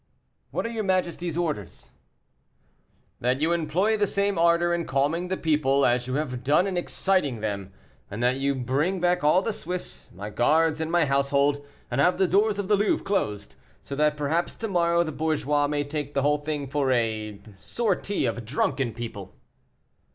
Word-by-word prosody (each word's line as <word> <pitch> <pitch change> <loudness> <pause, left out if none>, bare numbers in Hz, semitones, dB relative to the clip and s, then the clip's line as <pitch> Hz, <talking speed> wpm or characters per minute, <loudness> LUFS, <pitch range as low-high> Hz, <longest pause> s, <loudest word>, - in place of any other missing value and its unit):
"What - - -3
are - - -2
your 225 -2 -3
majesty's 175 -3 -1
orders?" 150 - -4 1.3
"That 125 +2 0
you 160 +3 +1
employ 170 +6 +1
the 205 -1 +2
same 200 +1 0
ardor 170 +1 +3
in 170 -1 -1
calming 145 +7 0
the 190 +1 -2
people 140 -3 +2
as 120 0 +1
you 130 - -2
have 130 -4 -3
done 150 +7 +3
in 195 -2 -2
exciting 175 - 0
them, 100 -3 -4 0.4
and 105 +4 -4
that 125 +1 +2
you 140 +1 0
bring 140 +9 0
back 180 0 +1
all 165 +6 +4
the 225 - -1
Swiss, 180 -1 -6
my 100 +4 -7
guards, 155 +7 +2
and 160 0 -2
my 170 -2 +3
household, 140 +1 +1 0.3
and 120 +3 +1
have 180 +5 +3
the 190 0 +3
doors 205 +3 +2
of 200 -2 -3
the 210 - +4
Louvre 205 +1 +1
closed, 105 - -2 0.3
so 140 - -6
that 150 +1 +2
perhaps 155 +4 -1
tomorrow 170 -5 +1
the 155 - -4
bourgeois 150 -1 0
may 145 0 -1
take 145 0 -5
the 140 - +1
whole 150 +1 +2
thing 145 -1 -3
for 135 -1 0
a 110 -4 -1 0.2
sortie 205 - -1
of 115 +1 -2
drunken 120 0 -1
people." 110 -5 -7
150 Hz, 180 wpm, -25 LUFS, 130-175 Hz, 1.3 s, all